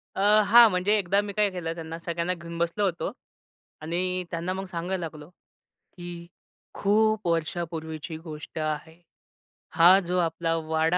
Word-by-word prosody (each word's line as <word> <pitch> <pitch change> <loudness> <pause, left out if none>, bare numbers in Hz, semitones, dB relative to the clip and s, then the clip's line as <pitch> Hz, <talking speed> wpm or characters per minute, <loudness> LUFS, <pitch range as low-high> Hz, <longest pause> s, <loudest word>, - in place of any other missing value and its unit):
अ, - - -4 0.3
हां, 235 +1 +9
म्हणजे 190 +3 +2
एकदा 200 0 +2
मी 205 -1 -6
काय 210 0 +2
केलं 170 -3 -4
त्यांना 165 0 -7
सगळ्यांना 170 +1 -2
घेऊन 170 -1 -8
बसलो 170 +5 -1
होतो 175 -3 -2 0.7
आणि 180 +3 -2
त्यांना 170 +1 -2
मग 190 +1 -4
सांगायला 180 +1 -3
लागलो, 155 -1 -10 0.5
की 175 -1 -10 0.5
खूप 215 0 +2
वर्षापूर्वीची 160 -1 -3
गोष्ट 160 0 -8
आहे. 155 +2 -4 0.7
हा 175 +4 +7
जो 180 -1 -2
आपला 165 -1 0
वाडा 160 +2 +1
170 Hz, 140 wpm, -26 LUFS, 165-185 Hz, 0.7 s, हां